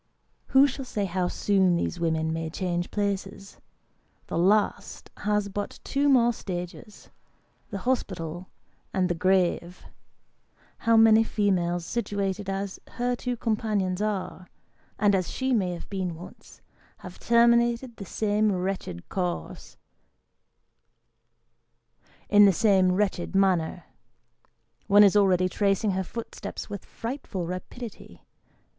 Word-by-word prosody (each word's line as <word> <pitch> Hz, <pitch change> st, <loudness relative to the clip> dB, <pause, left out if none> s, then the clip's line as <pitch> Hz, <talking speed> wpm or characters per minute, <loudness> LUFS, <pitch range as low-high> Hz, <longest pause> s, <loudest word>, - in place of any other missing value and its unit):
Who 270 Hz, +1 st, +6 dB
shall 275 Hz, 0 st, -3 dB
say 210 Hz, -5 st, -2 dB
how 180 Hz, -1 st, -1 dB
soon 190 Hz, -2 st, +2 dB
these 170 Hz, +1 st, -2 dB
women 160 Hz, -1 st, 0 dB
may 165 Hz, 0 st, -3 dB
change 175 Hz, 0 st, -2 dB
places? 200 Hz, -1 st, -4 dB, 0.7 s
The -, -, -4 dB
last 205 Hz, +4 st, +1 dB
has 210 Hz, -1 st, 0 dB
but 200 Hz, +1 st, -5 dB
two 285 Hz, +1 st, +1 dB
more 240 Hz, -3 st, +4 dB
stages 185 Hz, +2 st, -8 dB, 0.6 s
the 200 Hz, -, -4 dB
hospital 185 Hz, -7 st, -3 dB, 0.5 s
and 185 Hz, -1 st, +1 dB
the -, -, +1 dB
grave. 180 Hz, 0 st, 0 dB, 0.9 s
How 230 Hz, 0 st, +3 dB
many 225 Hz, 0 st, +7 dB
females 175 Hz, -6 st, 0 dB
situated 200 Hz, -3 st, -2 dB
as 195 Hz, 0 st, -4 dB
her 245 Hz, 0 st, -1 dB
two 245 Hz, 0 st, -4 dB
companions 210 Hz, -5 st, -1 dB
are, 195 Hz, -3 st, -3 dB, 0.5 s
and 205 Hz, 0 st, +3 dB
as 185 Hz, -2 st, 0 dB
she 260 Hz, 0 st, -1 dB
may 195 Hz, -6 st, +1 dB
have 170 Hz, -, -8 dB
been 185 Hz, -4 st, -3 dB
once, 175 Hz, +3 st, -13 dB, 0.4 s
have -, -, -10 dB
terminated 235 Hz, +1 st, +3 dB
the 200 Hz, -, -7 dB
same 210 Hz, 0 st, +1 dB
wretched 185 Hz, -, -4 dB
course, 180 Hz, -2 st, -4 dB, 2.5 s
in 205 Hz, 0 st, +7 dB
the 200 Hz, -, +6 dB
same 190 Hz, -1 st, +3 dB
wretched 190 Hz, -2 st, -1 dB
manner? 180 Hz, -3 st, +1 dB, 1.0 s
One 205 Hz, +1 st, +7 dB
is 200 Hz, 0 st, +5 dB
already 185 Hz, -3 st, +4 dB
tracing 200 Hz, +2 st, +1 dB
her 190 Hz, 0 st, -1 dB
footsteps 225 Hz, +1 st, -7 dB
with 200 Hz, -, -6 dB
frightful 230 Hz, -7 st, -5 dB
rapidity. 195 Hz, +6 st, -8 dB
195 Hz, 120 wpm, -26 LUFS, 180-215 Hz, 2.5 s, many